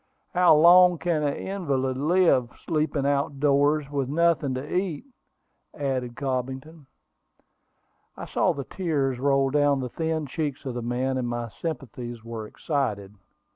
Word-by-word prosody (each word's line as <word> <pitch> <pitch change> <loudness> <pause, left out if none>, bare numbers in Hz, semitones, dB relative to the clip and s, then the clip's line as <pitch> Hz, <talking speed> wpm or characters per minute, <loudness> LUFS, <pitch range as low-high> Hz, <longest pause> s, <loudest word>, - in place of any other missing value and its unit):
How 180 -3 +6
long 175 +3 +7
can 160 0 -1
an 145 -1 0
invalid 140 -10 -2
live, 145 -4 +3 0.2
sleeping 155 -3 0
out 140 0 0
doors, 145 +1 +2
with 140 -3 -2
nothing 155 -3 +1
to 135 +6 -5
eat?" 180 - -2 0.7
added 130 -4 -3
Cobbington. 135 +3 -4 1.3
I - - -6
saw - - +1
the 140 - -5
tears 140 -7 -2
roll 135 0 +2
down 145 -1 +3
the 125 -1 -4
thin 160 +2 -2
cheeks 145 0 -4
of 130 - -3
the 120 - -4
man, 130 +2 -1
and 125 - -2
my 120 -1 -3
sympathies 120 -4 -6
were 115 -2 -6
excited. 105 -9 -3
140 Hz, 140 wpm, -25 LUFS, 130-155 Hz, 1.3 s, long